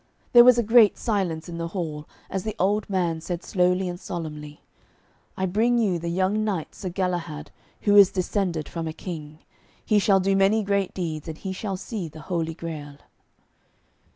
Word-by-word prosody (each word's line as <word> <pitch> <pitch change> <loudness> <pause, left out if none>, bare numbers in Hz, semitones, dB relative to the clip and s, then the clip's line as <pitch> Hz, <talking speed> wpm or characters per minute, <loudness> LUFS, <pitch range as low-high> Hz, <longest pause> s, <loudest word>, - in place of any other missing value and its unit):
There 240 -1 +10
was 250 0 +7
a 235 - +2
great 225 -1 +5
silence 185 -8 -1
in 170 -1 -6
the 165 - -2
hall 155 -4 -4 0.2
as 190 -1 -3
the 215 -1 -4
old 205 +2 +1
man 175 -4 0
said 175 +1 -4
slowly 180 0 +1
and 175 0 -5
solemnly, 150 -5 -7 0.8
'I 190 - 0
bring 225 +6 +2
you 200 -7 +1
the 170 +1 -4
young 190 +5 +1
knight 195 -7 -3
Sir 190 - -6
Galahad, 175 -4 -3 0.3
who 205 -1 +3
is 200 -2 +9
descended 180 -4 -1
from 165 -1 -5
a 160 - -4
king. 155 -4 -7 0.5
He 210 - +3
shall 195 -1 +4
do 195 +1 +1
many 200 +3 +3
great 200 -1 -1
deeds, 160 -4 -4
and 160 -1 -6
he 190 +1 -5
shall 195 0 -4
see 195 -2 -5
the 155 0 -11
Holy 165 -1 -2
Grail.' 150 -4 -7
180 Hz, 180 wpm, -25 LUFS, 165-200 Hz, 0.8 s, There